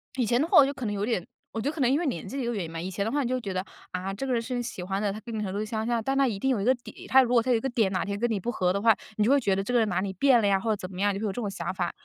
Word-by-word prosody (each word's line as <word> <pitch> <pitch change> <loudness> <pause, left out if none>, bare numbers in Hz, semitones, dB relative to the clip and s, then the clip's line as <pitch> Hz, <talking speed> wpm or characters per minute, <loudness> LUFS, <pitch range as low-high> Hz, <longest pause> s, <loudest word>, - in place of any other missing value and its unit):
以 255 -3 +1
前 240 +3 +2
的 315 - +1
话 - - +5
我 280 - +9
就 280 - -2
可 260 -3 -6
能 210 - -1
有 205 0 -1
点 215 -7 -1 0.3
我 225 - -3
觉 275 - 0
得 - - -4
可 310 - -4
能 245 - +4
因 280 - +3
为 345 - -1
年 265 - -3
纪 275 - -5
的 270 - -1
一 - - -2
个 240 - -1
原 200 -6 -2
因 165 - -8
吧， 165 - -5
以 180 +3 -4
前 200 +2 -2
的 220 - -2
话 290 0 +1
你 240 - -2
就 255 - +1
会 255 - -3
觉 200 - -4
得， 185 0 -2 0.3
啊， 185 +1 -3
这 240 +7 -4
个 255 - 0
人 235 - +2
是 230 +2 -5
你 245 - -1
喜 230 -6 -6
欢 195 +2 -2
的， 205 -1 0
他 210 - -6
跟 230 +2 -8
你 215 - -2
程 200 -3 -3
度 205 +2 -2
相 220 0 -3
像， 235 -2 0
但 270 +3 0
他 275 0 +4
一 220 -5 -2
定 265 +7 0
有 230 -6 0
一 - - -1
个 255 +2 +4
点， 240 - -12
他 265 - +6
如 245 - -2
果 240 - +5
他 250 - -3
有 245 - +4
一 - - -1
个 270 - -2
点 225 -6 +1
哪 185 -2 -1
天 200 0 -3
跟 240 +2 +1
你 215 -3 0
不 235 +6 -2
合 180 -5 +1
的 195 - 0
话， 225 +1 +5 0.2
你 215 - +1
就 230 - +3
会 280 - +5
觉 200 -7 +1
得 195 - -1
这 245 - -3
个 245 - +5
人 220 -2 +2
哪 180 - 0
里 190 0 -2
变 250 +6 +4
了 210 - +2
呀， 195 -1 +3
或 225 - -3
者 215 - +3
怎 185 -2 -8
么 180 - -7
样， 205 0 +3
你 - - -3
就 205 - -5
会 - - 0
有 - - -3
这 245 - -4
种 210 - -2
想 195 - -4
法。 180 -2 -2
220 Hz, 500 characters per minute, -27 LUFS, 195-245 Hz, 0.3 s, 我